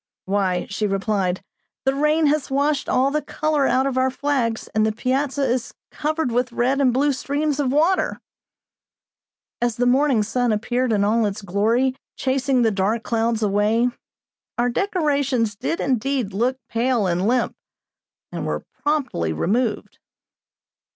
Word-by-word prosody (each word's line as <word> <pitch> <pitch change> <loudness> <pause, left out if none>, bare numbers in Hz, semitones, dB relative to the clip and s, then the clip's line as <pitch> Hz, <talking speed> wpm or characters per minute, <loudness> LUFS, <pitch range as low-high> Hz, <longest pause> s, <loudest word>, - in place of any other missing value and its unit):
"Why," 190 -2 0
she 210 +1 -2
replied, 195 -2 -1 0.4
"the 270 - +3
rain 300 +3 +2
has 295 -1 +1
washed 280 +1 0
all 265 +2 +2
the 300 +1 0
color 305 -3 0
out 260 +1 +2
of 265 -1 0
our 260 0 +3
flags, 260 -4 -1
and 215 - +2
the 220 - +2
piazza 270 +5 -1
is 250 -2 -1 0.2
covered 310 -3 -1
with 245 +1 0
red 260 +4 +1
and 260 -2 +4
blue 280 +3 +2
streams 285 +2 -1
of 270 -3 +1
water." 325 +7 +2 1.4
As 240 -2 +1
the 245 - 0
morning 255 -2 +3
sun 245 +2 0
appeared 240 +4 0
in 205 -2 +2
all 220 +1 +2
its 205 +1 -5
glory, 225 +7 +1 0.2
chasing 260 -1 +1
the 225 - +3
dark 210 +3 0
clouds 230 -1 0
away, 210 +4 +2 0.7
our 240 +1 +2
decorations 280 - 0
did 330 +10 -3
indeed 260 -4 -1
look 245 +6 0
pale 235 -2 +1
and 180 +2 0
limp, 245 +1 +1 0.8
and - - -4
were - - -3 0.2
promptly 280 - 0
removed. 215 - -1
250 Hz, 150 wpm, -22 LUFS, 215-275 Hz, 1.4 s, and